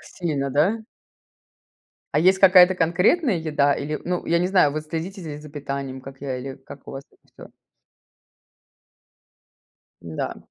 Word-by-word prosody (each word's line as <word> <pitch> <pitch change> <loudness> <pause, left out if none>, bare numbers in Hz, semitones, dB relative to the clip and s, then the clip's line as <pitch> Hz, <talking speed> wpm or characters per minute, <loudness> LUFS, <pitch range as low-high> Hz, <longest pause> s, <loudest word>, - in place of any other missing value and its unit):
Сильно, 145 -6 -2
да? 165 - +2 1.3
А - - +3
есть 185 +3 +4
какая-то 185 -1 +7
конкретная 180 - +2
еда? 150 -3 +1
Или, 150 +2 -4
ну, 180 0 -2
я 170 0 +2
не 180 - +1
знаю, 180 -7 +3
вы 155 +1 -3
следите 165 +5 -6
з 150 -3 -7
з - - -12
за 150 - -11
питанием, 140 -2 -5
как 135 0 -12
я 130 -2 -3
или 130 +1 -7
как 135 +1 -14
у - - -7
вас 135 0 -7
это - - -30
всё? - - -13 2.5
Да. 80 -2 -5
155 Hz, 155 wpm, -23 LUFS, 140-180 Hz, 2.5 s, какая-то